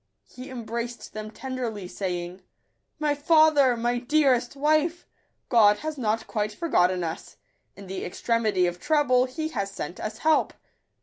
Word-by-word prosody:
He 255 +1 -10
embraced 235 -1 -6
them 215 0 -6
tenderly, 235 -5 -5
saying 180 -1 -4 0.2
,— - - -48
" - - -51
My 300 -1 +1
father! 290 -4 +4
my 240 +1 0
dearest 260 -2 +2
wife! 310 +4 +1 0.4
God 210 -4 +5
has 310 +3 -4
not 225 -4 -1
quite 210 -1 -2
forgotten 185 - +1
us: 165 -1 -6 0.4
in 200 - -11
the 190 0 -5
extremity 215 -1 0
of 175 0 -2
trouble 290 -5 +3
He 310 +5 -4
has 200 -9 -3
sent 180 -3 -7
us 215 0 -5
help." 315 +5 +2
240 Hz, 150 wpm, -26 LUFS, 205-290 Hz, 0.4 s, God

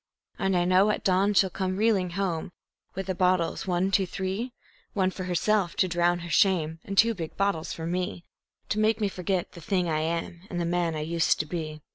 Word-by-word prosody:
And 195 -1 +1
I 175 - +2
know 185 +3 +4
at 210 - -1
the 190 - +4
dawn 200 +3 +2
she'll 190 -1 +4
come 185 0 -2
reeling 205 -4 +2
home 180 -4 -2 0.4
with 195 +1 -3
the 190 - -1
bottles, 180 -1 +1
one, 180 +1 +1
two, 195 -1 +2
three 195 +7 -3 0.4
One 190 -2 +1
for 185 - -6
herself, 180 +1 +1
to 185 - +2
drown 175 0 +1
her 170 - -7
shame, 165 -3 +2
and 195 0 -6
two 230 +2 +6
big 165 -6 -7
bottles 195 -4 0
for 160 - -5
me, 180 +1 -3 0.4
To 210 - 0
make 220 +1 +2
me 210 - +1
forget 185 -1 -2
the 170 - -12
thing 180 +1 0
I 155 -2 0
am 170 +1 -3
and 175 - -3
the 170 - 0
man 170 -1 0
I 155 - -3
used 165 +1 +1
to - - -7
be. 155 -2 -5
180 Hz, 220 wpm, -27 LUFS, 170-195 Hz, 0.4 s, two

